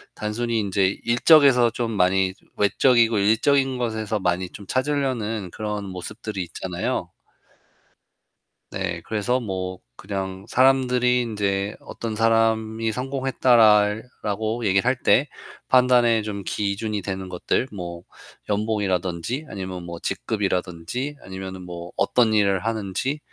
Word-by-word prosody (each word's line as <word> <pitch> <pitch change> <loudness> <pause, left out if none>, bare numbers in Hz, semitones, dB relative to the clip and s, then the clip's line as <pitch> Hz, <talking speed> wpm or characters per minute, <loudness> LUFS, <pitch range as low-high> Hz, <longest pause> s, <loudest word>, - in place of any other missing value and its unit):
단순히 115 +2 -2
인제 100 -2 +1 0.2
일적에서 125 0 +5
좀 115 0 -3
많이 95 -1 +2 0.2
외적이고 115 +2 +3
일적인 130 +6 +2
것에서 110 -3 -2
많이 90 -1 -1
좀 100 - -11
찾으려는 130 -6 -1
그런 105 0 -4
모습들이 100 +2 -6
있잖아요. 85 +1 -4 1.6
네, 90 -3 -3
그래서 110 +4 0
뭐 95 -5 -4 0.2
그냥 95 -1 -5
사람들이 125 -1 +3
인제 100 -3 -1
"어떤 115 -2 -6
사람이 115 0 +1
성공했다."랄 120 -5 +3 0.2
라고 110 +3 -2
얘기를 100 0 +2
할 125 +1 +3
때 140 - +4 0.4
판단의 125 -3 +4
좀 105 -2 -5
기준이 105 +1 -2
되는 95 -1 -5
것들. 90 +7 -1
뭐, 85 -3 -7 0.4
연봉이라든지 105 - -1
아니면 95 -2 -6
뭐 85 0 -7
직급이라든지 100 - -3
아니면은 95 -1 -7
뭐 85 0 -8
어떤 120 -3 +3
일을 100 -3 +3
하는지 115 +6 -2
105 Hz, 280 characters per minute, -23 LUFS, 95-120 Hz, 1.6 s, 일적에서